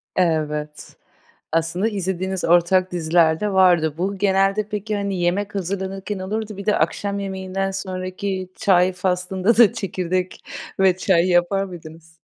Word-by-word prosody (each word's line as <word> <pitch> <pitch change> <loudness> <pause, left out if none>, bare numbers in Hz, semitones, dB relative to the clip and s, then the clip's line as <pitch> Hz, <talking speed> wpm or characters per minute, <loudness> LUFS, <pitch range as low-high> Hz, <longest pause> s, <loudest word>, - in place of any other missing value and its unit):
Evet. 150 -4 -2 0.5
Aslında 165 +5 0
izlediğiniz 190 -2 -3
ortak 175 +2 +3
diziler 165 -1 +2
de 210 -1 -1
vardı. 175 -5 +4
Bu 195 +3 -2
genelde 195 +1 +2
peki, 210 +1 -3
hani, 200 -2 -2
yemek 195 +4 -1
hazırlanırken 195 +1 -4
olurdu, 210 +2 -4
bir 200 - -7
de 210 - +3
akşam 200 +5 -1
yemeğinden 195 0 -3
sonraki 185 0 -4
çay 185 -1 +3
faslında 185 +3 0
da 230 -2 +6
çekirdek 185 -4 -3 0.4
ve 190 -2 +4
çay 185 -2 +2
yapar 180 +2 +2
mıydınız? 165 -3 -11
185 Hz, 130 wpm, -21 LUFS, 175-195 Hz, 0.5 s, da